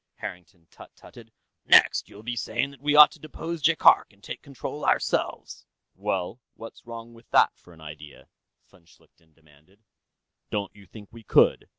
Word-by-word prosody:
Harrington 90 -1 -10
tut - - -15
tutted. 115 -2 -16 0.3
"Next, - - +4
you'll 105 - -14
be 120 +1 -4
saying 140 +4 -2
that 140 -2 -18
we 145 0 +1
ought 150 0 +9
to 175 - -16
depose 160 +2 -7
Jaikark 160 +2 +4
and 100 -1 -28
take - - -8
control 140 +2 -8
ourselves." - - -1 0.3
"Well, 100 +3 -4
what's 115 +1 -13
wrong 115 0 -9
with 115 0 -19
that, - - +3
for 90 - -21
an 80 -2 -18
idea?" 75 -1 -12 0.4
von 90 -4 -24
Schlichten 80 -2 -27
demanded. 80 +6 -26 0.7
"Don't 100 -2 -4
you 100 -2 -17
think 105 -3 -14
we 115 - -13
could? 110 - +2
105 Hz, 170 wpm, -25 LUFS, 90-120 Hz, 0.7 s, ought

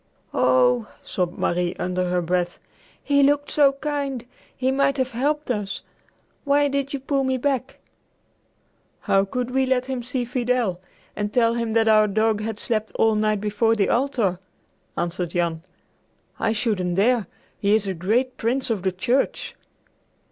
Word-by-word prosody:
"Oh," 125 -2 +3
sobbed 180 -1 -2
Marie 175 0 0
under 180 0 -1
her 180 0 0
breath, 175 +1 -1 0.5
"he 285 -1 +3
looked 290 +1 +2
so 280 -2 +5
kind! 275 -3 -3 0.3
He 260 +1 +1
might 275 +1 +2
have 260 0 0
helped 290 +4 -1
us. 205 -4 -3 0.6
Why 285 0 +3
did 280 0 -2
you 280 - -3
pull 275 +1 0
me 260 0 0
back?" 270 0 -1 1.2
"How 195 0 +2
could 250 +4 -3
we 265 0 +1
let 255 -1 +1
him 260 -2 -3
see 250 +1 -2
Fidel, 240 -6 0 0.4
and 210 0 -2
tell 230 0 +3
him 230 -1 -2
that 225 0 +3
our 215 -1 +5
dog 215 +1 +1
had 220 0 -4
slept 220 -2 -1
all 225 0 +3
night 215 -1 +1
before 215 +2 +1
the 200 -3 +1
altar?" 235 -8 +1 0.6
answered 175 0 -2
Jan. 170 -2 -1 0.8
"I 220 - +1
shouldn't 210 -6 -1
dare! 220 +1 +2 0.3
He 205 +1 +3
is 215 -2 +1
a 195 - -1
great 225 +9 0
Prince 245 +2 -1
of 210 -4 -1
the 190 0 0
Church!" 240 +9 -1
225 Hz, 160 wpm, -23 LUFS, 195-260 Hz, 1.2 s, so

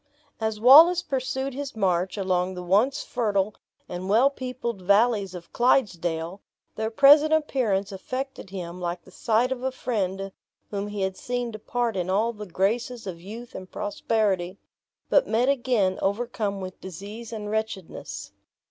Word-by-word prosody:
As 220 -1 -2
Wallace 320 +9 +8
pursued 265 0 -2
his 275 -1 -5
march 185 -2 0
along 185 -1 0
the 180 - -6
once 220 +11 +2
fertile 205 -3 0 0.3
and 180 +2 -5
well 240 +7 +5
peopled 250 -6 -5
valleys 200 0 +3
of 175 -1 -10
Clydesdale, 180 -8 +1 0.3
their 220 0 -1
present 290 +6 +6
appearance 240 -11 +1
affected 255 +4 -5
him 180 -2 -6
like 175 0 -3
the 185 - -17
sight 230 +6 +1
of 255 -2 -2
a 260 +1 -1
friend 195 -6 -2 0.4
whom 200 0 -3
he 205 -1 -4
had 190 0 -1
seen 245 -1 -3
depart 230 +1 -2
in 180 -1 -2
all 215 +5 +1
the 210 -1 -8
graces 225 +7 -1
of 175 -3 -6
youth 225 +6 -9
and 185 0 -8
prosperity, 200 -3 -1 0.5
but - - +4
met 240 +4 +2
again 240 -8 +1
overcome 205 -1 -1
with 185 -1 -8
disease 205 +5 -8
and 210 -2 -5
wretchedness. 220 -4 -4
210 Hz, 150 wpm, -25 LUFS, 190-245 Hz, 0.5 s, Wallace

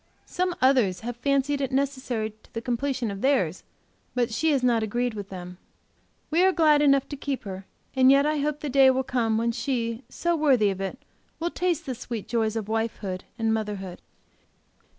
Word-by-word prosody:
Some 360 -1 -1
others 250 -9 +3
have 240 +1 -4
fancied 275 +2 +1
it 270 -1 -1
necessary 260 -5 -1
to - - -24
the 230 - -2
completion 250 -1 -1
of 200 0 -6
theirs, 220 - +1 0.5
but 240 -2 0
she 315 +8 +1
has 275 -4 +2
not 235 -2 +3
a 220 - -1
greed 240 +2 -1
with 205 -2 -7
them. 180 -1 -8 0.7
We 330 +3 +3
are 380 - +5
glad 310 -4 +4
enough 275 -2 +4
to 285 - -4
keep 275 -1 -4
her; 190 -2 -7 0.3
and 260 0 +6
yet 275 +1 +6
I 305 0 +1
hope 295 +1 -1
the 300 - -3
day 270 0 +6
will 260 0 +2
come 240 -4 0
when 230 +1 +1
she, 230 -1 -2
so 345 0 0
worthy 260 -10 +3
of 195 0 -5
it, 195 +6 -3 0.4
will 340 +1 -1
taste 350 -3 -1
the 260 - -3
sweet 230 -3 -6
joys 225 -2 0
of 220 -3 -3
wifehood 220 -4 -3
and 225 -1 +1
motherhood. 205 -4 -4
245 Hz, 195 wpm, -26 LUFS, 220-280 Hz, 0.7 s, and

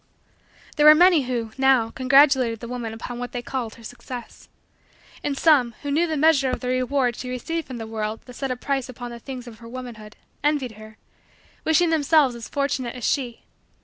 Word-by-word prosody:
There 300 0 +6
were 305 - +10
many 345 -4 +5
who, 235 -3 -3
now, 260 -4 +4
congratulated 265 -3 +4
the 235 - -7
woman 240 -2 -4
upon 240 +2 -7
what 245 0 -6
they 245 -1 -4
called 245 -4 -4
her 230 - -16
success. 245 +1 -9 0.7
And 280 -1 -2
some, 265 -8 +4
who 285 - -3
knew 330 +4 +2
the 315 -2 -2
measure 285 -3 +4
of - - -2
the 250 - -4
reward 255 -1 +1
she 250 - -6
received 325 +6 -4
from 255 - -7
the 225 - -6
world 220 0 -4
that 250 - -11
set 270 +2 -4
a 255 - -1
price 270 0 -2
upon 245 -1 -7
the 235 - -8
things 255 0 -8
of 230 -3 -12
her 230 - -12
womanhood, 235 -4 -9 0.3
envied 290 -4 +1
her; 215 0 -13 0.7
wishing 325 +2 +3
themselves 300 -3 +3
as 235 -1 -9
fortunate 275 -4 -2
as 250 - -8
she. 245 -3 -1
255 Hz, 200 wpm, -23 LUFS, 235-280 Hz, 0.7 s, were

